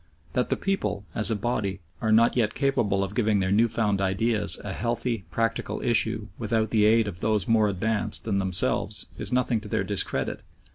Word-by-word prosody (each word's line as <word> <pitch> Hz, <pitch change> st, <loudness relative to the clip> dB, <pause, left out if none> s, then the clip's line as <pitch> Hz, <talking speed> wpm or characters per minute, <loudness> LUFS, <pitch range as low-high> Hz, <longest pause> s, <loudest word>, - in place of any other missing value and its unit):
That -, -, 0 dB
the -, -, +1 dB
people, 150 Hz, -, -2 dB
as 110 Hz, -, +3 dB
a 110 Hz, -, +1 dB
body, 105 Hz, -3 st, -2 dB, 0.2 s
are 110 Hz, -2 st, 0 dB
not 115 Hz, +2 st, +4 dB
yet 110 Hz, -4 st, +1 dB
capable 110 Hz, -9 st, +1 dB
of 100 Hz, 0 st, -5 dB
giving 110 Hz, -3 st, +1 dB
their 95 Hz, 0 st, 0 dB
new 110 Hz, +4 st, +4 dB
found 105 Hz, -3 st, 0 dB
ideas 100 Hz, +2 st, +1 dB
a 100 Hz, -, -4 dB
healthy, 115 Hz, -2 st, -2 dB
practical 115 Hz, +6 st, -2 dB
issue 110 Hz, -2 st, +1 dB
without 110 Hz, -1 st, 0 dB
the 105 Hz, -2 st, +3 dB
aid 110 Hz, 0 st, +4 dB
of 90 Hz, -4 st, -6 dB
those 105 Hz, -3 st, 0 dB
more 110 Hz, -2 st, +3 dB
advanced 105 Hz, +2 st, -1 dB
than 100 Hz, -3 st, 0 dB
themselves 95 Hz, -1 st, 0 dB
is -, -, -1 dB
nothing 125 Hz, -3 st, +1 dB
to 110 Hz, -, -9 dB
their -, -, -1 dB
discredit. -, -, 0 dB
110 Hz, 190 wpm, -26 LUFS, 100-115 Hz, 0.2 s, not